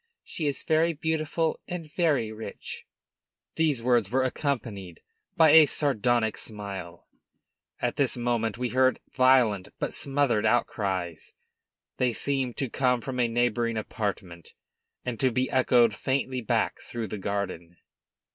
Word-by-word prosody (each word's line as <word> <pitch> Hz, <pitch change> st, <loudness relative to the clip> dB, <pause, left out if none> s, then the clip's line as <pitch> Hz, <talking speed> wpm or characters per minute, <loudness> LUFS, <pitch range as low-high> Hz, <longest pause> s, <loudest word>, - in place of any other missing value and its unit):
She 155 Hz, -, -4 dB
is 140 Hz, -, -2 dB
very 160 Hz, +1 st, +2 dB
beautiful 160 Hz, +1 st, -1 dB
and 175 Hz, -2 st, -5 dB
very 145 Hz, -11 st, +1 dB
rich." 110 Hz, -2 st, -8 dB, 0.7 s
These 150 Hz, -7 st, +1 dB
words 120 Hz, -5 st, +2 dB
were 130 Hz, +3 st, +1 dB
accompanied 115 Hz, -, -3 dB, 0.3 s
by 160 Hz, -2 st, +7 dB
a 160 Hz, -1 st, +8 dB
sardonic 120 Hz, -6 st, +1 dB
smile. 100 Hz, -5 st, -6 dB, 0.7 s
At -, -, -2 dB
this -, -, +1 dB
moment 120 Hz, -2 st, -1 dB
we 125 Hz, 0 st, -2 dB
heard 130 Hz, +1 st, +2 dB
violent, 125 Hz, -7 st, +3 dB
but -, -, -3 dB
smothered 135 Hz, -6 st, +1 dB
outcries; 95 Hz, -8 st, -1 dB, 0.6 s
they 125 Hz, -2 st, +1 dB
seemed 135 Hz, -1 st, -1 dB
to 135 Hz, -, -1 dB
come 125 Hz, +1 st, +1 dB
from 130 Hz, 0 st, -5 dB
a 120 Hz, -, +3 dB
neighboring 120 Hz, -1 st, 0 dB
apartment 95 Hz, -6 st, -5 dB, 0.5 s
and 120 Hz, -3 st, -4 dB
to 130 Hz, -, +3 dB
be 125 Hz, +2 st, -1 dB
echoed 125 Hz, -3 st, +4 dB
faintly 130 Hz, +2 st, -1 dB
back 110 Hz, -, 0 dB
through 120 Hz, -2 st, -5 dB
the 105 Hz, -, -5 dB
garden. 95 Hz, -4 st, -4 dB
120 Hz, 135 wpm, -27 LUFS, 105-135 Hz, 0.7 s, a